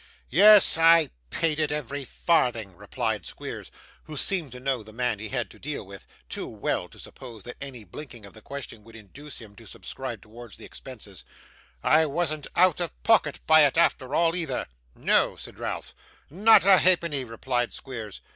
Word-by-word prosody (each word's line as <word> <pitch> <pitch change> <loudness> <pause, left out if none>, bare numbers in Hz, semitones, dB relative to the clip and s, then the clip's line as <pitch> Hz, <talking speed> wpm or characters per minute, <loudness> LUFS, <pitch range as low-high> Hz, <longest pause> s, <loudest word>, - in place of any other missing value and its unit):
'Yes, 205 -1 +7
I 165 -2 +6 0.2
paid 160 - 0
it, 155 -1 0
every 145 -1 -4
farthing,' 120 - 0
replied - - -3
Squeers, - - -7 0.4
who 155 -1 -8
seemed 170 -4 -2
to 125 - -9
know 130 -2 -1
the 110 0 -14
man 120 -2 -1
he 110 - -6
had 120 -5 -1
to - - -15
deal 150 -6 -5
with, 100 0 -12 0.2
too - - -5
well - - -3
to - - -17
suppose 115 -6 -11
that 120 - -9
any 130 -5 -8
blinking 120 - -10
of 100 - -14
the 110 - -14
question 125 -4 -8
would 115 +1 -16
induce 130 +7 -11
him 105 -3 -13
to - - -14
subscribe - - -7
towards 115 0 -12
the - - -12
expenses; - - -10 0.6
'I 155 +1 +4
wasn't 155 0 -2
out 180 -2 +4
of 170 -3 -5
pocket 160 -11 +3
by 155 0 +7
it 145 +1 +2
after 145 -5 +2
all, 165 0 +2
either.' 160 -8 -2 0.3
'No!' - - +2
said - - -12
Ralph. - - -5 0.4
'Not 205 +5 +6
a 195 -1 +7
halfpenny,' 170 -6 +2
replied 120 +1 -2
Squeers. 115 -7 -8
140 Hz, 180 wpm, -26 LUFS, 115-160 Hz, 0.6 s, Yes